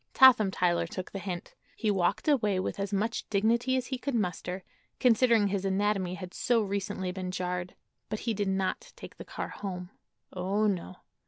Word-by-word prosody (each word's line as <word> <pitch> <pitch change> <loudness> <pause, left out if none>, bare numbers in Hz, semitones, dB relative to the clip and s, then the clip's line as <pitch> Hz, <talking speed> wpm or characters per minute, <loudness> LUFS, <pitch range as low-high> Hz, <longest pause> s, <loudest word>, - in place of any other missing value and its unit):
Totham 250 -6 +8
Tyler 175 -3 +1
took 185 +2 -6
the 195 - -4
hint. 180 -2 -5 0.2
He 215 -3 +1
walked 190 - +1
away 215 -10 +3
with 185 - -3
as 200 +1 -2
much 210 +3 -1
dignity 235 +5 +2
as 255 - -1
he 260 0 -4
could 280 -1 -2
muster, 185 -2 -2 0.4
considering 230 -3 +4
his 195 -1 -1
anatomy 195 -1 +1
had 185 -1 -8
so 235 -3 +2
recently 195 -2 -2
been 185 0 -4
jarred; 180 0 -3 0.3
but 215 - -3
he 230 - 0
did 205 -1 -1
not 190 0 -1
take - - -11
the - - -8
car - - -5
home. 180 -2 -6 0.4
Oh, 195 +4 0
no. 185 -3 -1
195 Hz, 180 wpm, -29 LUFS, 185-220 Hz, 0.4 s, Totham